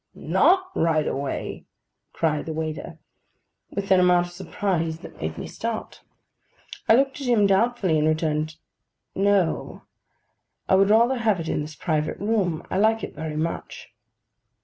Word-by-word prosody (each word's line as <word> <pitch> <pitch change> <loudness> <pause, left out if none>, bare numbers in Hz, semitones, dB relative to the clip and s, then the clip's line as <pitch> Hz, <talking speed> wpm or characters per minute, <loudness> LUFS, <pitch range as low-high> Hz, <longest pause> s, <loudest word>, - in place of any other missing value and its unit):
'Not 375 +1 +2
right 160 -2 +1
away?' 140 0 -4 0.4
cried 155 -2 -1
the 160 - -3
waiter, 160 +1 -5 0.7
with 200 0 -4
an 190 - +6
amount 180 -1 +4
of 175 - -11
surprise 175 -3 -2
that - - -12
made 80 +1 -3
me - - -5
start. 230 -1 -5 0.9
I 225 - +8
looked 270 +2 +1
at 270 - -4
him 230 -4 +4
doubtfully, 195 -4 +2
and 150 - +2
returned, 155 0 0 0.6
'No; 195 -3 0 0.8
I - - +2
would 195 +1 +5
rather 235 +4 +4
have 215 -5 +2
it 165 - -4
in - - 0
this 150 +1 -7
private 155 -3 -1
room. 200 -6 -1
I 190 - +1
like 220 +2 +3
it - - -5
very 155 0 -5
much. 165 +2 -4
180 Hz, 150 wpm, -24 LUFS, 155-215 Hz, 0.9 s, I